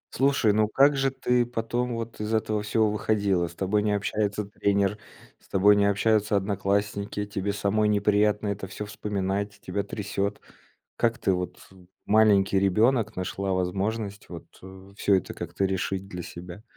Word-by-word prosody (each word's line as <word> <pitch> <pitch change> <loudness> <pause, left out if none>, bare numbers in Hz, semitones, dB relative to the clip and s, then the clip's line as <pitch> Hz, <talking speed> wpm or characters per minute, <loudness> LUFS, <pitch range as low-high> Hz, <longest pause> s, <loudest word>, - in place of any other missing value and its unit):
Слушай, 135 -5 +3
ну 110 0 +3
как 140 +5 +4
же 135 0 +2
ты 125 -2 +1
потом 120 +1 -2
вот 115 -1 -6
из 110 +1 -1
этого 110 -1 0
всего 105 0 +1
выходила? 100 -5 +1
С 85 - -12
тобой 100 +2 0
не 105 0 +1
общается 105 0 -1
тренер, 100 0 0 0.4
с - - -25
тобой 100 +2 +5
не 100 0 +3
общаются 105 +1 +2
одноклассники, 100 +1 -1
тебе 100 0 -3
самой 100 +1 +1
неприятно 105 0 +2
это 100 -1 -4
всё 105 +2 -6
вспоминать, 100 -1 -3
тебя 100 +2 -3
трясет. 100 0 -3 0.6
Как 120 +1 +1
ты 95 -4 +1
вот, 90 0 -4
э, - - -18 0.3
маленький 100 -2 +4
ребенок, 110 +3 +2
нашла 95 +1 -2
возможность 100 +3 -2
вот, 85 -2 -9 0.2
э, 95 +1 -13
всё 100 -2 +3
это 95 - -4
как-то 95 - -2
решить 95 0 -2
для 90 -2 -6
себя? 90 +5 -10
100 Hz, 160 wpm, -26 LUFS, 95-110 Hz, 0.6 s, тобой